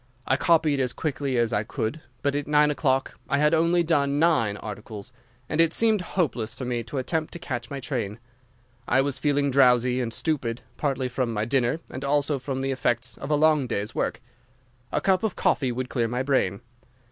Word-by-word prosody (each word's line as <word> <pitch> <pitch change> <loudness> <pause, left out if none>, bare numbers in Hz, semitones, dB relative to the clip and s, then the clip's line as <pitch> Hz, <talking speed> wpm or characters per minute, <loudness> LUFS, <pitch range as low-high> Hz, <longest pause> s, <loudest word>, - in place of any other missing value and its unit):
I 130 - +2
copied 155 -2 +3
as 125 -2 0
quickly 140 -4 -2
as 120 -1 +1
I 105 - +2
could, 110 +7 -3 0.2
but 140 - +1
at 145 0 -2
nine 150 0 +4
o'clock 135 -2 0
I 140 - +2
had 150 +2 +3
only 170 +2 +3
done 145 -4 +1
nine 130 -11 +2
articles, 105 +1 -8 0.4
and 155 - +2
it 165 0 +3
seemed 220 -3 +3 0.2
hopeless 120 - 0
for 130 - -5
me 120 -1 -1
to 135 - -6
attempt 155 +4 -2
to - - -5
catch 120 -7 -5
my 140 - -5
train. 115 -7 -3 0.7
I 130 +2 +4
was 140 -1 -1
feeling 145 -1 +1
drowsy 125 -1 +4
and 115 -2 -2
stupid, 125 -4 -2
partly 135 -3 -1
from 125 -1 -1
my 105 -1 -1
dinner 130 +5 +1
and 130 - -7
also 145 0 +1
from 130 +1 -3
the 135 0 -1
effects 130 -1 -1
of 140 - -6
a 150 - +3
long 150 -3 +3
day's 105 -1 -3
work. - - -2 0.7
A 150 - 0
cup 185 +2 +3
of 220 -4 -1
coffee 130 -3 +1
would 125 +1 -3
clear 120 -3 0
my 125 +3 -1
brain. 125 -8 +1
135 Hz, 200 wpm, -25 LUFS, 120-150 Hz, 0.7 s, nine